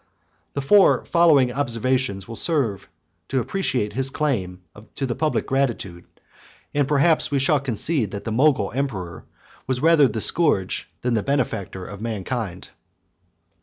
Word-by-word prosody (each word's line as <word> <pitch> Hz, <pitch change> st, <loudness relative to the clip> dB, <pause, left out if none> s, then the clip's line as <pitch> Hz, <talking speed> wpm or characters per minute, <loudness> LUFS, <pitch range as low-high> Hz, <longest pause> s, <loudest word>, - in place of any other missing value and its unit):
The 140 Hz, -, -2 dB
four 200 Hz, +7 st, +4 dB
following 155 Hz, -7 st, +4 dB
observations 125 Hz, -5 st, -1 dB
will 115 Hz, -, -7 dB
serve 115 Hz, -, 0 dB, 0.4 s
to 135 Hz, -, 0 dB
appreciate 125 Hz, -, -1 dB
his 135 Hz, +1 st, -1 dB
claim 100 Hz, -, -2 dB, 0.3 s
to 135 Hz, -, -2 dB
the 125 Hz, -, -2 dB
public 155 Hz, +4 st, -1 dB
gratitude; 120 Hz, -10 st, -2 dB, 0.7 s
and 145 Hz, -2 st, +1 dB
perhaps 150 Hz, +3 st, +2 dB
we 145 Hz, -, 0 dB
shall 140 Hz, +2 st, +2 dB
conclude, 135 Hz, -, -1 dB
that 100 Hz, 0 st, -7 dB
the 110 Hz, -, -4 dB
Mogul 135 Hz, +4 st, +2 dB
emperor 100 Hz, -, -4 dB, 0.4 s
was 130 Hz, -1 st, -1 dB
rather 155 Hz, -1 st, +5 dB
the 110 Hz, -1 st, -4 dB
scourge 105 Hz, -, +2 dB
than 125 Hz, 0 st, 0 dB
the 110 Hz, -, +1 dB
benefactor 100 Hz, -8 st, -2 dB
of 100 Hz, +1 st, -9 dB
mankind. 110 Hz, -3 st, -4 dB
130 Hz, 140 wpm, -22 LUFS, 105-145 Hz, 0.7 s, rather